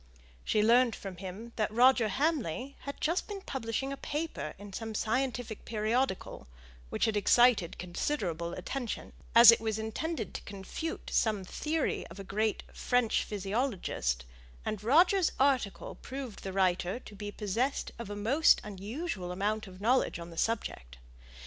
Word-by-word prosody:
She 210 - +2
learnt 235 +1 +5
from 190 -3 -8
him 200 +6 -8
that 215 -2 +1
Roger 245 0 +5
Hamley 275 - -1
had 280 - -5
just 335 +4 0
been 405 -2 -6
publishing 265 -1 -3
a - - -6
paper 300 - -4
in 200 0 -10
some 225 +1 -5
scientific 240 0 -1
periodical, 220 0 -1 0.4
which - - +1
had 220 -2 0
excited 220 -3 +4
considerable 175 - -2
attention, 240 +6 -4 0.2
as 235 0 +12
it 230 - +2
was 220 -1 -1
intended 220 +4 -3
to - - -5
confute 200 +12 -6
some 215 -4 +2
theory 305 - -2
of 170 +4 -11
a - - -5
great 210 +3 -1
French 245 -2 +1
physiologist, 195 - -2 0.4
and 210 -1 -3
Roger's 345 - +4
article 260 -7 +1
proved 260 -4 -7
the 195 - -5
writer 185 +2 +1
to 215 - -12
be 205 0 -6
possessed 230 +7 -1
of 235 -3 -6
a 205 - -4
most 250 +10 +4
unusual 205 - -5
amount 210 +3 -1
of 185 -1 -12
knowledge 245 +1 +2
on 170 0 -8
the - - -10
subject. 65 - -2
220 Hz, 150 wpm, -31 LUFS, 195-260 Hz, 0.4 s, as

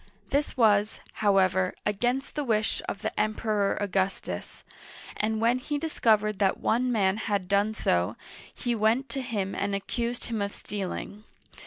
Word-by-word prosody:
This 285 0 0
was, 210 -2 +3
however, 190 -3 +2
against 245 +6 0
the 295 - -2
wish 220 -4 +1
of - - -5
the - - 0
Emperor 215 -1 +1
Augustus, 195 -1 -2 0.5
and 215 +1 0
when 235 +3 +3
he 290 +3 -2
discovered 215 -9 +2
that 195 -2 +2
one 250 +2 +1
man 200 -3 +2
had 205 -4 -1
done 200 +3 +2
so, 90 - +1 0.4
he 240 - -2
went 230 +5 +2
to 270 - -2
him 210 -6 -2
and 200 0 -1
accused 235 +4 -2
him 225 -3 -3
of 200 0 -2
stealing. 205 +1 -5
215 Hz, 150 wpm, -28 LUFS, 200-235 Hz, 0.5 s, was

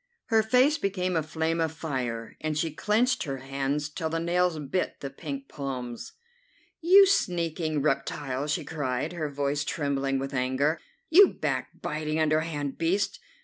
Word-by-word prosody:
Her 225 -1 +5
face 255 +7 +3
became 185 -4 -1
a 160 - +3
flame 160 +2 -1
of 160 -2 +1
fire, 125 -8 -4
and 155 -1 -1
she 160 +1 0
clenched 215 - +1
her 135 -2 -3
hands 135 +2 -2
till 160 +1 -4
the 165 +1 -1
nails 175 0 +1
bit 150 +5 -2
the 140 - -6
pink 275 - -6
palms. 125 -4 -5 0.7
"You 380 +4 +8
sneaking 165 - 0
reptile!" 140 -1 -1
she 150 +2 -1
cried, 145 0 -2
her 155 -4 -3
voice 145 +1 -1
trembling 140 -2 -1
with 135 +1 -4
anger; 135 +5 +1 0.3
"you 385 +4 +9
backbiting, 155 +1 -3
underhand 155 -2 0
beast! 180 +5 0
155 Hz, 145 wpm, -27 LUFS, 140-175 Hz, 0.7 s, you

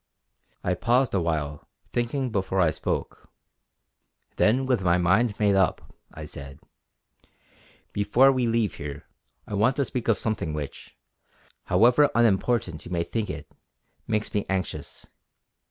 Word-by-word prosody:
I 90 - +1
paused 120 +8 +2
a 95 - +2
while 75 -3 -2 0.3
thinking 120 +2 -1
before 95 -2 -1
I 85 -4 +4
spoke. - - -4 1.1
Then 125 +5 +3
with 125 -5 +1
my 90 -1 +3
mind 100 +5 +2
made 105 -2 +3
up 95 -2 +1 0.2
I 80 - -8
said: 70 -2 -9 1.3
"Before 120 +7 +4
we 130 -2 0
leave 115 -2 0
here 70 0 -7 0.4
I - - -8
want 110 +6 +2
to 140 - +1
speak 125 -1 -4
of 115 -4 +3
something 105 -9 -2
which, 75 -2 -7 0.7
however 125 +6 +5
unimportant 110 -6 +1
you 85 - -10
may 85 -1 0
think 110 +3 -3
it, - - -7 0.6
makes 110 -1 -1
me 105 - +1
anxious. 95 -2 -4
105 Hz, 140 wpm, -26 LUFS, 85-120 Hz, 1.3 s, however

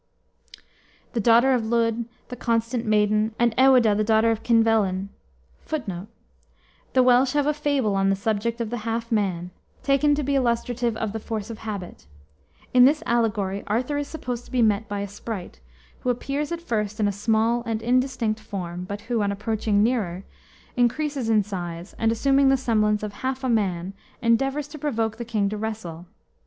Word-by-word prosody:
] - - -33
the 235 - 0
daughter 235 +4 +5
of 250 - +2
Lludd, 230 0 0 0.2
the 250 - -5
constant 230 0 -1
maiden, 215 +1 +2
and 240 -1 +2
Ewaedah, 255 -5 +5
the 215 - +1
daughter 220 +1 +3
of 225 -1 -2
Kynvelyn, 220 -5 +2 0.6
[Footnote: 210 - -4 0.9
The 255 - +5
Welsh 255 +1 +4
have 290 -1 +2
a 300 - +2
fable 285 -7 0
on 195 0 +2
the 195 - +3
subject 220 +3 -1
of 230 -2 -3
the 240 - -2
half 230 +2 -3
man, 185 -5 0 0.3
taken 290 +1 +3
to 295 - -2
be 280 +1 -1
illustrative 240 -2 0
of 220 -2 -3
the 220 - -3
force 220 0 -5
of 220 - -8
habit. 200 - -7 0.7
In 250 0 +8
this 300 +3 +3
allegory 210 -4 0
Arthur 250 +7 0
is 290 - -3
supposed 250 -6 -5
to - - -17
be 250 -2 +2
met 215 0 +2
by 205 -1 -3
a 200 - -3
sprite, 200 - -7 0.4
who 250 - -2
appears 275 +5 -2
at 340 0 -4
first 215 -6 -2
in 210 - +2
a - - +1
small 220 +3 +1
and 225 -1 -2
indistinct 245 -3 +1
form, 180 -5 -6
but 200 +2 -6
who, 230 0 -1
on 200 -1 +1
approaching 210 0 0
nearer, 200 -7 -1 0.5
increases 255 +1 0
in 215 -2 +4
size, 175 -2 -6
and, 225 0 +2
assuming 270 +4 +3
the 270 - +4
semblance 215 -4 +1
of 210 -1 -4
half 260 +1 -2
a 260 - 0
man, 190 -5 0 0.3
endeavors 270 +5 +1
to 305 - -9
provoke 225 -6 -1
the 235 - -5
king 215 -3 0
to 210 +1 -3
wrestle. 205 -6 -5
225 Hz, 185 wpm, -24 LUFS, 210-250 Hz, 0.9 s, In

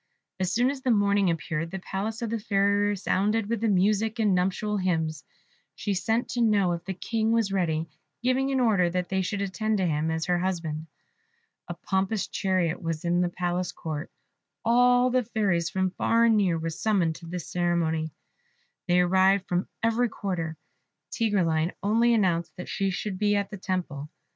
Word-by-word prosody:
As 185 -1 0
soon 245 +5 +2
as 275 -2 -7
the 260 - -1
morning 200 -3 +3
appeared, 165 0 -2
the 190 - -5
palace 210 +5 -4
of 225 - -3
the 230 - -1
Fairy 200 -1 +2
resounded 205 +2 0
with 230 -1 -2
music 210 +2 +2
and 215 -4 +2
nuptial 195 +3 0
hymns; 160 -5 -1 0.5
she 205 - -2
sent 225 +5 0
to 245 - -1
know 205 -5 +3
if 170 -1 -3
the 190 0 -4
King 225 +3 -1
was 225 -4 +1
ready, 165 -4 0 0.4
giving 260 +2 +2
an 270 -1 +1
order 205 -8 +3
that 180 0 -2
they 190 0 0
should 200 +2 -2
attend 210 +3 -1
to 190 - +1
him 155 -1 0
as 160 0 -1
her 175 -1 +1
husband. 165 -4 -3 0.8
A 175 - -5
pompous 190 +4 -1
chariot 185 -3 0
was 165 0 -3
in 175 +1 +2
the 175 - +1
palace 175 0 -2
court. 155 0 -6 0.5
All 245 +2 +4
the 255 0 +2
fairies 200 -7 0
from 190 -1 0
far 230 +4 +2
and 230 -1 +4
near 190 -5 +2
were 165 0 -3
summoned 185 -2 +1
to 170 - -12
this 175 0 -5
ceremony; 165 -3 0 0.8
they 180 0 +4
arrived 190 +2 +3
from 180 +1 -1 0.2
every 230 +1 +2
quarter. 170 -7 -4 0.5
Tigreline 175 -7 +1
only 230 +3 +3
announced 175 -6 0
that 180 - -8
she 195 0 0
should 190 0 -4
be 205 -1 +2
at 200 0 -1
the 205 - -6
temple. 175 -7 -3
190 Hz, 180 wpm, -27 LUFS, 175-215 Hz, 0.8 s, All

